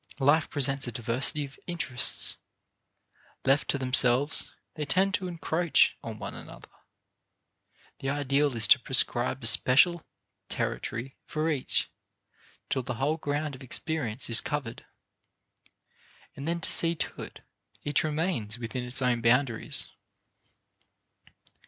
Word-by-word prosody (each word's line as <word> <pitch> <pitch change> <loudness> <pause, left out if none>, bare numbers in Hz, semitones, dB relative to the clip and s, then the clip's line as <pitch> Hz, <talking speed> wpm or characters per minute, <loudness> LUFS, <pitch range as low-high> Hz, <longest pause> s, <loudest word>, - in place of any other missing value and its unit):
Life 145 +2 +2
presents 135 -2 0
a - - -4
diversity 120 +6 -2
of 135 -1 -15
interests. 170 -8 -1 1.1
Left 135 +1 +2
to - - +2
themselves, 130 +2 +3 0.2
they 155 - -5
tend 190 +7 +1
to 190 -2 -1
encroach 170 -1 +1
on - - -7
one - - -7
another. - - -12 1.3
The 135 - -3
ideal 140 -1 0
is 110 -2 +3
to 130 - +7
prescribe 125 0 +1
a - - -2
special 145 +9 +4 0.5
territory 125 +4 -4
for 155 +1 -1
each 140 -4 0 0.8
till 130 - -1
the 125 0 -5
whole 145 +7 -1
ground 145 -1 -3
of 130 - -11
experience 130 -2 -3
is 115 - +8
covered, 140 -6 -5 1.5
and 140 +2 -7
then 170 0 -3
see 165 0 +5
to - - -5
it - - -10 0.4
each 145 -1 +1
remains 150 - -2
within 120 +1 -5
its 125 +2 -4
own 120 -2 +1
boundaries. 120 0 +1
135 Hz, 125 wpm, -27 LUFS, 125-155 Hz, 1.5 s, is